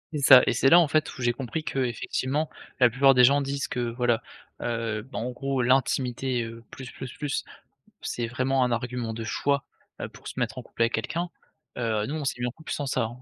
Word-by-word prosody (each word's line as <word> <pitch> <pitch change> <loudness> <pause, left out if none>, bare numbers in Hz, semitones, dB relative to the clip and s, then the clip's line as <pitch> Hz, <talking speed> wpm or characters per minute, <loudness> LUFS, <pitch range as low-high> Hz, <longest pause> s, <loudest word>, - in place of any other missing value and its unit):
C'est 150 - -1
ça 135 -2 +9
et - - +2
c'est 120 +3 +3
là, 170 - +8
en 165 -4 +3
fait, 155 +1 0
où - - -7
j'ai 120 -1 +3
compris 135 +5 -4
qu'effectivement 135 +2 -1 0.3
la 125 - +7
plupart 135 +3 +5
des 125 -1 +5
gens 140 +3 +6
disent 140 0 -3
que, - - -3
voilà, 120 -1 +1 0.4
heu, 115 -2 -2
bah, 130 +3 -6
en 120 +2 -3
gros, 135 +1 -2
l'intimité, 130 -1 +1
heu, 115 0 -8
plus, 130 -1 -9
plus, 130 -2 -8
plus, 145 -1 -2 0.6
c'est 120 - -2
vraiment 130 +2 +1
un 125 - 0
argument 120 -1 -2
de 115 - -5
choix, 140 +5 0 0.4
heu, - - -3
pour - - -17
se - - -5
mettre - - -2
en - - -5
couple - - -3
avec 115 0 +1
quelqu'un, 170 +10 -2 0.5
heu, 110 -3 0
nous 150 - -3
on 155 - -4
s'est 135 - -2
mis 120 - 0
en - - -3
couple 160 +6 -8
sans 145 - -3
ça, 130 -2 0
hein, 115 +2 -5
125 Hz, 230 wpm, -26 LUFS, 120-140 Hz, 0.6 s, ça